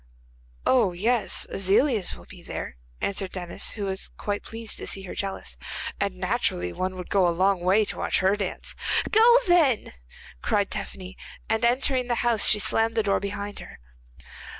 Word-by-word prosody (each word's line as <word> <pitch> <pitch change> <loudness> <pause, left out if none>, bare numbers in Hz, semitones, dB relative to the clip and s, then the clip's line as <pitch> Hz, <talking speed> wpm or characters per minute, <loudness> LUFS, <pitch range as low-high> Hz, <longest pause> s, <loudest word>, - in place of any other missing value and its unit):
'Oh 240 -8 +3
yes, 225 +6 +1
Aziliez 200 +2 +2
will - - -14
be - - -13
there,' - - -6 0.3
answered 195 -1 -2
Denis, 175 -2 -4
who 210 - -5
was 190 0 -4
quite 205 -1 -3
pleased 225 -1 -4
to - - -6
see 195 - -2
her 185 - -7
jealous, 190 - -5 0.4
'and - - -1
naturally 90 +7 -1
one 185 0 -3
would 180 -1 -8
go 190 -3 +4
a - - +3
long 185 +2 +2
way 195 +4 +3
to - - -5
watch - - +2
her 190 +2 +3
dance.' 200 -3 -4 0.4
'Go 465 +3 +7
then!' 315 -10 +3 0.5
cried 200 -1 0
Tephany, 185 0 -6 0.3
and 220 0 0
entering 255 +1 +1
the 240 - +1
house 230 -3 +4
she 215 - +5
slammed 225 +2 +1
the 220 - +3
door 200 -1 +2
behind 200 0 -5
her. - - -11
200 Hz, 175 wpm, -25 LUFS, 190-230 Hz, 0.5 s, Go